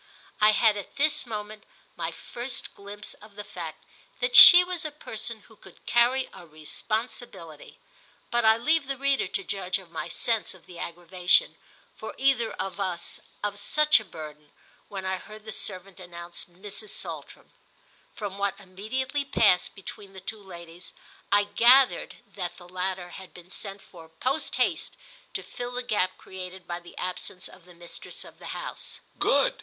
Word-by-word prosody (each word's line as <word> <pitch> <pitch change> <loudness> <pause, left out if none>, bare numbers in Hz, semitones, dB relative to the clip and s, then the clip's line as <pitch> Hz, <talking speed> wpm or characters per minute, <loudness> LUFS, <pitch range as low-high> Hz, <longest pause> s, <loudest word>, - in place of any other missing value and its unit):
I 210 - +8
had 215 0 +4
at 200 - -8
this 290 -3 +2
moment 215 -1 -6 0.3
my - - -2
first 245 +2 -4
glimpse 205 +1 -7
of 210 -1 -16
the 205 - -6
fact 170 -6 -8 0.3
that 245 0 +1
she 355 +7 +13
was 360 -2 -3
a 310 - -2
person 230 -6 -5
who 220 - -19
could 190 -3 -17
carry 250 +2 +3
a - - -11
responsibility; 165 - -5 0.5
but 240 0 +2
I 220 0 +6
leave 305 +4 +2
the 275 -1 -2
reader 275 0 +2
to 380 - -2
judge 190 - -1
of 185 -4 -14
my 165 - -4
sense 225 -5 -1
of 185 - -19
the 175 -2 -12
aggravation, 175 +2 +2 0.4
for - - -7
either 260 -4 +3
of 195 0 -4
us, 180 -3 -2 0.2
of 205 -1 -1
such 300 +8 +5
a - - -8
burden, 150 -5 -10 0.4
when 195 -2 -5
I 190 0 0
heard 215 +3 -12
the 220 - -6
servant 195 -1 -3
announce 175 -1 -8
Mrs. 200 +4 -5
Saltram. - - -7 0.6
From 200 -2 -5
what 200 0 -1
immediately 250 +9 -3
passed 210 -9 +3
between 195 0 -10
the 190 - -9
two 205 +3 -6
ladies 175 -2 -11 0.4
I 205 0 +6
gathered 240 +6 +5 0.2
that 180 -3 -4
the 175 - -13
latter 185 0 -3
had 190 +1 -11
been 180 +1 -13
sent 195 -1 -7
for 165 -3 -14
post 255 - -2
haste - - 0 0.4
to - - -2
fill 245 0 -6
the 250 0 -2
gap 205 -6 0
created 185 0 -9
by 175 0 -4
the 175 0 -15
absence 180 0 -4
of 180 -2 -16
the 180 -1 -16
mistress 170 0 -6
of - - -15
the - - -9
house. - - -6 0.2
"Good!" - - +4
200 Hz, 170 wpm, -27 LUFS, 180-235 Hz, 0.6 s, she